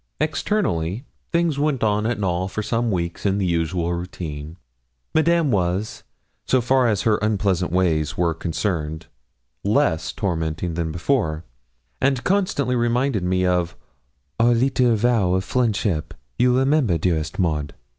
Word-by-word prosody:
Externally 105 - -1 0.3
things 170 -4 +1
went 145 -4 0
on 105 0 +1
at 120 -2 -1
Knowl 90 -2 0
for 110 +3 -4
some 115 +2 0
weeks 85 -4 -2
in 100 -1 +1
the 100 - 0
usual 85 0 0
routine. 80 -3 -6 0.6
Madame 165 -2 +3
was, 95 +1 -1 0.4
so 130 - +2
far 125 +1 +3
as 105 -4 +1
her 110 -2 +3
unpleasant 100 -4 0
ways 80 -4 +1
were 85 -2 +2
concerned, 80 -2 -3 0.6
less 100 - +1
tormenting 80 -2 -2
than 80 -1 -2
before, 85 - -1 0.6
and 135 -2 +1
constantly 180 -10 +1
reminded 120 -2 +1
me 90 +1 +1
of 90 -2 0 0.6
'our 120 +1 +4
leetle 125 -1 +2
vow 110 -5 +2
of 95 - 0
friendship, 100 -9 -1 0.2
you 125 0 +4
remember, 135 - +2
dearest 80 -2 -1
Maud!' 75 -6 -1
100 Hz, 135 wpm, -22 LUFS, 85-125 Hz, 0.6 s, our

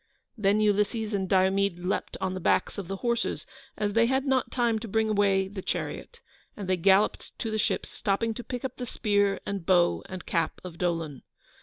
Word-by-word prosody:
Then 210 -2 +2
Ulysses 210 +1 +1
and 190 -2 -1
Diomede 190 0 +3
leaped 180 +2 -2
on 190 -1 -1
the 185 - -4
backs 185 - +1
of 190 - -6
the 195 - -3
horses, 235 0 0 0.3
as 205 -1 -1
they 230 +1 +4
had 265 +2 +1
not 265 -2 +1
time 235 -3 +1
to 225 - -7
bring 220 +1 +1
away 195 -2 +3
the 195 0 -7
chariot, 470 - -4 0.4
and 200 -4 -5
they 185 - +3
galloped 195 +4 +2
to 225 - -3
the 220 - -1
ships, - - 0
stopping 225 +2 0
to 245 - -7
pick 250 +1 -5
up 260 - -5
the 250 - -5
spear, 205 -3 +1
and 200 -3 -3
bow, 175 -1 +3
and 185 -1 -7
cap 165 -2 -1
of 175 -2 -9
Dolon. 165 -6 -2
200 Hz, 200 wpm, -28 LUFS, 190-225 Hz, 0.4 s, they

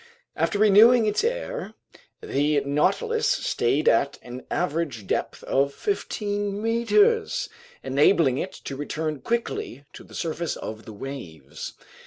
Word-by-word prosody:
After 205 - 0
renewing 215 +3 +6
its 210 - +1
air, - - -3 0.5
the 145 +1 +1
Nautilus 445 - +1
stayed 145 - +1
at 140 +5 +3
an 125 +1 -9
average 150 - -2
depth - - -2
of 140 +1 +1
fifteen 205 - -2
meters, 415 - +2 0.3
enabling 140 0 +3
it 190 - -4
to 135 - -4
return 155 +1 -3
quickly 185 - -3
to - - -11
the - - -14
surface 165 0 -2
of 110 +1 -7
the 110 - -9
waves. 85 - -8
165 Hz, 125 wpm, -25 LUFS, 135-230 Hz, 0.5 s, renewing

